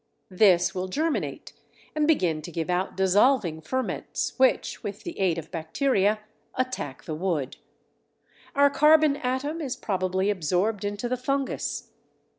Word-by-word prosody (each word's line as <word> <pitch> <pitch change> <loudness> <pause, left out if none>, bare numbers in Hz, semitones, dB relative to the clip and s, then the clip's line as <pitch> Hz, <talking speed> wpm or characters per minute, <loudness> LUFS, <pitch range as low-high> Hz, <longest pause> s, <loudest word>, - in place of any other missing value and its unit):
This 185 -2 +4
will 185 -1 -3
germinate 310 - -2 0.4
and 300 -1 +2
begin 180 - +2
to 175 - -8
give 165 +2 -2
out 180 +2 -1
dissolving 190 - +3
ferments 260 +11 -3
which, 260 0 +2
with 205 0 -6
the 345 - -7
aid 180 -4 +2
of 165 - -7
bacteria, 205 - +1 0.3
attack 255 - -3
the 155 - -5
wood. 155 -5 -2 1.0
Our 285 0 +5
carbon 300 0 +5
atom 285 +4 -2
is 270 -4 -3
probably 190 -3 0
absorbed 185 +4 0
into 205 +3 -3
the 255 +1 -1
fungus. 275 +2 -2
205 Hz, 135 wpm, -26 LUFS, 180-265 Hz, 1.0 s, Our